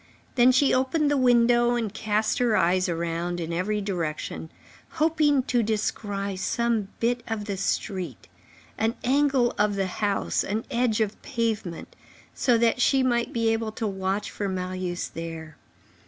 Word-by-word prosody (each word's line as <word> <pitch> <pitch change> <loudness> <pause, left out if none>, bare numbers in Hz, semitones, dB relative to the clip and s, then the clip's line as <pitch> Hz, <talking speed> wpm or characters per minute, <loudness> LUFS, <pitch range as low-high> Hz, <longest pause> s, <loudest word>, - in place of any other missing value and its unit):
Then 250 0 +5
she 265 +2 +3
opened 285 +4 +2
the - - +3
window 240 -2 +4
and 225 -4 -2
cast 215 0 0
her 240 -3 +3
eyes 185 +1 +2
around 170 +1 -2
her 170 - -3
in 165 - -5
every 205 +5 -1
direction, 165 -5 -4 0.4
hoping 305 -4 +2
to 245 -2 +1
descry 205 -2 -2
some 230 +1 0
bit 240 +1 +1
of 220 -2 -3
the 200 -2 -3
street, 190 -1 -3 0.5
an 225 +1 +1
angle 270 -2 +2
of 205 -1 +2
the 195 -1 0
house, 200 +2 -1
an 215 +3 -3
edge 235 -3 +1
of 210 -1 -2
pavement, 225 - -3 0.4
so 245 -3 +2
that 235 +2 +2
she 265 +1 +4
might 240 -2 +1
be 230 -1 +1
able 225 -1 -2
to 225 - -3
watch 195 +1 -2
for 200 -1 -3
Marius 185 -1 -3
there. 165 -2 -7
220 Hz, 155 wpm, -26 LUFS, 190-240 Hz, 0.5 s, Then